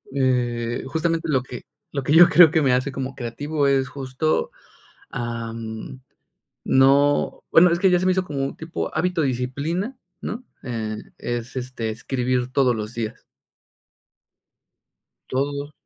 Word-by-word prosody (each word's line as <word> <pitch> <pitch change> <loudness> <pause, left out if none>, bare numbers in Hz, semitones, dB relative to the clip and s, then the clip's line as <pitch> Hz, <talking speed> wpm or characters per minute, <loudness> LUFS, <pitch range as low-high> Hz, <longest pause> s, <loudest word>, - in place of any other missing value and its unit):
eh, 120 -3 0
justamente 165 +2 -1
lo 135 -4 +2
que 125 -2 -9 0.3
lo 140 -2 -3
que 145 - +1
yo 170 +2 +9
creo 165 0 +8
que 160 -1 +3
me 135 -3 +3
hace 130 +2 +1
como 135 -1 -5
creativo 145 +5 -2
es 135 -1 +2
justo, 135 +3 -1 0.6
ah, 115 -1 -4
mm, 115 +3 -7 0.7
no, 140 +2 +3
bueno, 170 +1 +7
es 170 - +1
que 190 0 +4
ya 180 - +4
se 185 - -1
me 185 - +4
hizo 185 0 +1
como 140 -4 -3
tipo 160 +1 -5
hábito, 175 +1 +1
disciplina, 140 - -2 0.2
¿no?, 235 +4 -5 0.2
eh, 110 -4 -3 0.2
es, 120 +1 -4
este, 125 -3 -4
escribir 125 +2 -1
todos 130 -3 +3
los 105 +1 -5
días. 115 -2 -5 2.1
Todos. 140 +2 -2
135 Hz, 145 wpm, -23 LUFS, 125-155 Hz, 2.1 s, yo